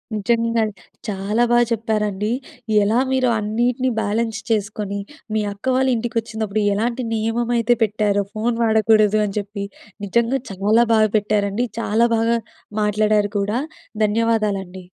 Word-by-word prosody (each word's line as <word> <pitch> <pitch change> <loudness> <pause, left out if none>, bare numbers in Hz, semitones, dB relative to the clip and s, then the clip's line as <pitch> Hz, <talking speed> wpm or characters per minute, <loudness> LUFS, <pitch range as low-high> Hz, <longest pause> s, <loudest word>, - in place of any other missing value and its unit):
నిజంగా. 230 +1 +1 0.4
చాలా 210 +3 0
బాగా 240 0 +5
చెప్పారండి. 210 -2 -1 0.5
ఎలా 220 +4 +2
మీరు 255 -1 +2
అన్నిటిని 240 +5 0
బ్యాలెన్స్ 220 +2 -1
చేసుకొనీ, 205 -2 -1 0.4
మీ 215 - +2
అక్క 200 - -16
వాళ్ళ 265 +1 +2
ఇంటికొచ్చిందప్పుడు, 220 -2 -2
ఎలాంటి 235 +4 -1
నియమయితే 235 +1 +1
పెట్టారో 205 -1 +1
ఫోను 230 +2 -1
వాడకూడదు 220 -1 +4
అని 200 0 -5
చెప్పి. 200 0 -6 0.4
నిజంగా 235 +6 +1
చాలా 210 +5 +3
బాగా 215 -1 +4
పెట్టారండి, 210 +2 0
చాలా 230 +1 +2
బాగా 230 +1 +2 0.5
మాట్లాడారు 210 0 +2
కూడా. 210 +5 0 0.5
ధన్యవాదాలండి. 205 -4 -1
215 Hz, 115 wpm, -21 LUFS, 205-230 Hz, 0.5 s, బాగా